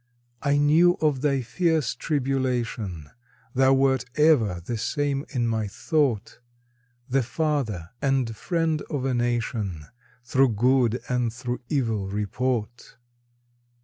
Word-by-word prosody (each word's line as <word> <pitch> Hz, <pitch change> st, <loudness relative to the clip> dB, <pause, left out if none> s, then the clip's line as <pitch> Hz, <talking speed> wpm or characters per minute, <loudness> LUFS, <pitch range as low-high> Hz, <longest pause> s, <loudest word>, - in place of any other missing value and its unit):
I 145 Hz, 0 st, +2 dB
knew 160 Hz, +5 st, +5 dB
of 150 Hz, -4 st, +1 dB
thy 140 Hz, -3 st, +1 dB
fierce 160 Hz, -1 st, 0 dB
tribulation, 125 Hz, -, -2 dB, 0.4 s
Thou 130 Hz, +1 st, +4 dB
wert 135 Hz, -2 st, +2 dB
ever 130 Hz, -, +3 dB
the 95 Hz, +8 st, -5 dB
same 145 Hz, +3 st, -1 dB
in 125 Hz, -4 st, -1 dB
my 110 Hz, -2 st, -1 dB
thought 130 Hz, 0 st, -1 dB, 0.7 s
The 135 Hz, +2 st, +2 dB
father 125 Hz, -, -2 dB
and 135 Hz, -5 st, 0 dB
friend 160 Hz, -, -1 dB
of 135 Hz, -3 st, -2 dB
a 135 Hz, -, 0 dB
nation 115 Hz, -, -1 dB, 0.4 s
Through 130 Hz, 0 st, +2 dB
good 125 Hz, +1 st, +2 dB
and 125 Hz, -2 st, 0 dB
through 120 Hz, +1 st, -4 dB
evil 115 Hz, -9 st, 0 dB
report. 110 Hz, +3 st, -3 dB
125 Hz, 115 wpm, -25 LUFS, 115-145 Hz, 0.7 s, knew